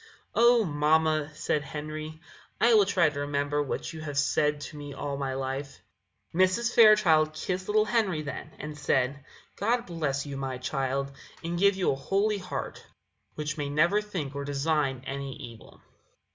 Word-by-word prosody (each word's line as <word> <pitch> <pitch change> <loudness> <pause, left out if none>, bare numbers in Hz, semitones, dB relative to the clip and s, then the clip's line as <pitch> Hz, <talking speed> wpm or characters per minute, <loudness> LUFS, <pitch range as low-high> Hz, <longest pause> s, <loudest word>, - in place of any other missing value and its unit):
"Oh, 235 0 +5
mamma," 155 -1 +2
said 155 -1 0
Henry, 155 +2 -6 0.4
"I 235 - +5
will 205 -3 +6
try 180 -5 +3
to 145 - -6
remember 145 0 0
what 145 +3 -4
you 160 - -7
have 145 -2 -5
said 150 +1 +2
to 150 - -8
me 145 -1 -8
all 140 0 -3
my 135 -1 -3
life." 135 +1 -4 0.5
Mrs. 185 +7 +2
Fairchild 175 -9 +6
kissed 185 +3 -3
little 215 +1 +3
Henry 200 -10 +1
then, 140 +1 -6
and 150 0 -7
said: 140 -1 0 0.3
"God 235 +4 +1
bless 150 -5 -2
you, 140 -1 -6
my 135 -1 -3
child, 135 +1 -2 0.3
and 170 +1 -2
give 200 +1 +4
you 190 -2 +1
a - - -1
holy 200 +9 0
heart, 180 -1 -5 0.5
which 150 0 -4
may 145 -1 -2
never 170 +8 +3
think 180 -10 -5
or 140 0 -4
design 140 -2 0
any 135 -1 -5
evil." 120 -7 -12
150 Hz, 165 wpm, -28 LUFS, 140-185 Hz, 0.5 s, will